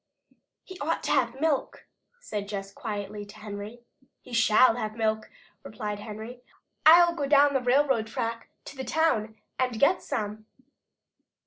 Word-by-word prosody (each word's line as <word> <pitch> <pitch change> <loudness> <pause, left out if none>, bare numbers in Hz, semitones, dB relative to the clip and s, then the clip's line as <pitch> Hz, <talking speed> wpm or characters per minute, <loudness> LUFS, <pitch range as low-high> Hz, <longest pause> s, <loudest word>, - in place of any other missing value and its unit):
"He 375 -1 -11
ought 315 +3 -2
to - - -1
have 260 -2 +1
milk," 305 -3 -1 0.3
said 210 - -5
Jess 195 -1 -6
quietly 210 -5 -5
to 205 0 -13
Henry. 210 +2 -8 0.4
"He 250 - -13
shall 225 +1 +5
have 215 -2 -4
milk," 220 -1 -1 0.3
replied 210 -1 -5
Henry. 220 +4 -8 0.5
"I'll 340 +1 +8
go 290 -4 -3
down 285 0 +5
the 270 - +1
railroad 250 -2 +2
track 230 +1 -4 0.2
to - - -10
the 265 - -5
town 230 -7 0 0.2
and 250 -3 0
get 345 +7 +3
some." 215 -4 -4
230 Hz, 145 wpm, -27 LUFS, 215-280 Hz, 0.5 s, I'll